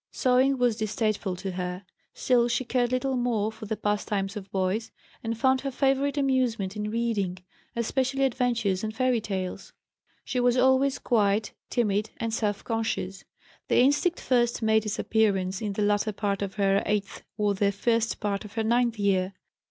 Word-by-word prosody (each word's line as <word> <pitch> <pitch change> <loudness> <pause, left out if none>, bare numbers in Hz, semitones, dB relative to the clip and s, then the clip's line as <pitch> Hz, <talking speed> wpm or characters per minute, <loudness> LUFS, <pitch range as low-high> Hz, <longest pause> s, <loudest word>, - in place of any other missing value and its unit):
Sewing 260 +1 +2
was 245 -3 +2
distasteful 215 -3 -1
to 190 +1 -5
her. 180 +1 -4 0.3
Still 240 -2 +3
she 240 +2 -1
cared 245 0 +1
little 260 +1 0
more 230 -4 0
for 220 -1 -10
the 220 - -2
pastimes 205 -1 -1
of 200 -2 -7
boys, 195 +4 -1 0.3
and 225 0 -2
found 260 +2 +3
her 275 - -2
favorite 275 +2 +1
amusement 250 -8 +1
in 210 0 -3
reading, 215 -5 -1 0.4
especially 265 +3 0
adventures 235 -7 0
and 220 0 -3
fairy 255 -1 +2
tales. 190 -3 -4 0.5
She 255 - -1
was 245 0 +3
always 265 +2 +3
quiet, 215 -2 +1 0.2
timid, 215 -3 0
and 230 -1 -3
self 210 -3 -1
conscious. 220 -4 -3 0.4
The - - +2
instinct 290 +7 +3
first 240 -2 +1
made 220 0 +3
its 210 - -2
appearance 195 -3 +1
in 210 -2 -2
the 210 - -1
latter 205 +1 +1
part 200 -1 -2
of 200 0 -3
her 195 -1 +2
eighth 205 -1 -1 0.2
or 210 -1 +2
the 200 +1 +1
first 230 +2 0
part 205 -1 -2
of 210 - -11
her 225 -1 -1
ninth 235 0 +2
year. 195 -2 +1
220 Hz, 170 wpm, -27 LUFS, 200-245 Hz, 0.5 s, Still